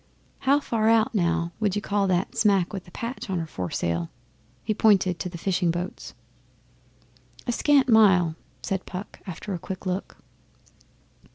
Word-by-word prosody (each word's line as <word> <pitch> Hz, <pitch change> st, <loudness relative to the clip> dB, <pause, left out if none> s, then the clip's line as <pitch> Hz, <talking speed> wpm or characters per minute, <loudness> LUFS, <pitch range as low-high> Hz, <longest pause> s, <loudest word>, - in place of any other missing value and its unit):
'How 275 Hz, +2 st, +3 dB
far 225 Hz, -5 st, +1 dB
out, 230 Hz, +2 st, +3 dB
now, 170 Hz, -3 st, +1 dB
would 210 Hz, -3 st, +1 dB
you 205 Hz, -, -1 dB
call 200 Hz, -1 st, +1 dB
that 180 Hz, 0 st, 0 dB
smack 200 Hz, -4 st, +2 dB
with 190 Hz, -3 st, -5 dB
the -, -, -14 dB
patch 235 Hz, +1 st, -6 dB
on 190 Hz, -, 0 dB
her 165 Hz, -, -2 dB
foresail?' 85 Hz, -, -2 dB, 0.5 s
He 215 Hz, -, 0 dB
pointed 195 Hz, -5 st, +3 dB
to 180 Hz, -, -3 dB
the 175 Hz, -, -8 dB
fishing 175 Hz, 0 st, 0 dB
boats. 175 Hz, +2 st, -4 dB, 1.3 s
'A 245 Hz, -, 0 dB
scant 280 Hz, +2 st, +3 dB
mile,' 190 Hz, -8 st, +5 dB, 0.3 s
said 190 Hz, -1 st, -3 dB
Puck 190 Hz, +2 st, -7 dB
after 190 Hz, +3 st, -5 dB
a 175 Hz, -, -3 dB
quick 190 Hz, +3 st, -7 dB
look. 185 Hz, +1 st, -3 dB
190 Hz, 160 wpm, -25 LUFS, 175-215 Hz, 1.3 s, mile